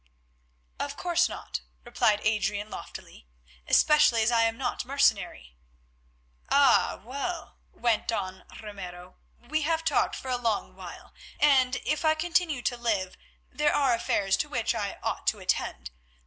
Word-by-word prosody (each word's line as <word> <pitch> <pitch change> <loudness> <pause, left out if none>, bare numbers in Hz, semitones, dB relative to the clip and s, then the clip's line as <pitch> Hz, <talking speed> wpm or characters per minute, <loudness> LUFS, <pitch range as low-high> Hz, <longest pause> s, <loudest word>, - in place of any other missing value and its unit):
"Of 285 0 -4
course 350 0 +2
not," - - -6 0.2
replied 235 -3 +1
Adrian, 210 0 0
loftily, - - -10 0.4
"especially 270 -7 +5
as 225 - +2
I 230 -1 +4
am 225 0 -1
not 250 -2 -2
mercenary." 220 - 0 0.9
"Ah! 280 -3 +4
well," 280 - -5
went 235 -1 0
on 190 -4 -4 0.2
Ramiro, 185 -4 -9 0.3
"we 310 +3 0
have 325 +2 0
talked 310 - +1
for 260 - -7
a 250 - +1
long 225 -3 -1
while, - - -11 0.3
and 265 -3 +4
if 305 - 0
I 315 0 +4
continue 330 -5 0
to 245 - -1
live 210 -6 -1 0.4
there 295 0 +1
are 275 -4 +3
affairs 195 -4 +1
to 300 - -2
which 235 -5 0
I 205 -3 -3
ought - - -3
to - - +1
attend. 65 0 -2
240 Hz, 145 wpm, -27 LUFS, 210-295 Hz, 0.9 s, especially